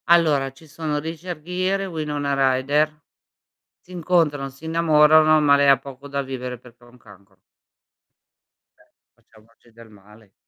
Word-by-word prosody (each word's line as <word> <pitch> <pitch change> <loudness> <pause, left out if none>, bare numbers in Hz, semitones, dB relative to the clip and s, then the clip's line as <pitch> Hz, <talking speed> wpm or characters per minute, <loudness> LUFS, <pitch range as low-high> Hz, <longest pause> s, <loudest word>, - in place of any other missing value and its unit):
Allora, 155 -6 +3
ci 135 +4 -19
sono: 155 0 -4
Richard 165 +1 -7
Gere 185 +3 -2
e - - -4
Winona 145 -5 -1
Rider. 150 +4 0 0.8
Si 180 - -18
incontrano, 165 -5 0
si 135 +4 -18
innamorano, 155 -1 +4
ma 145 -1 +4
lei 140 0 +2
ha 135 -1 +6
poco 135 +1 -12
da 140 0 -3
vivere 125 -2 -6
perché 120 0 -19
ha - - -19
un 125 +1 -20
cancro. 100 -3 -20 1.4
Cioè, - - -27 0.2
facciamoci 115 +2 -25
del 115 0 -16
male. 105 0 -20
145 Hz, 150 wpm, -22 LUFS, 125-160 Hz, 1.4 s, ha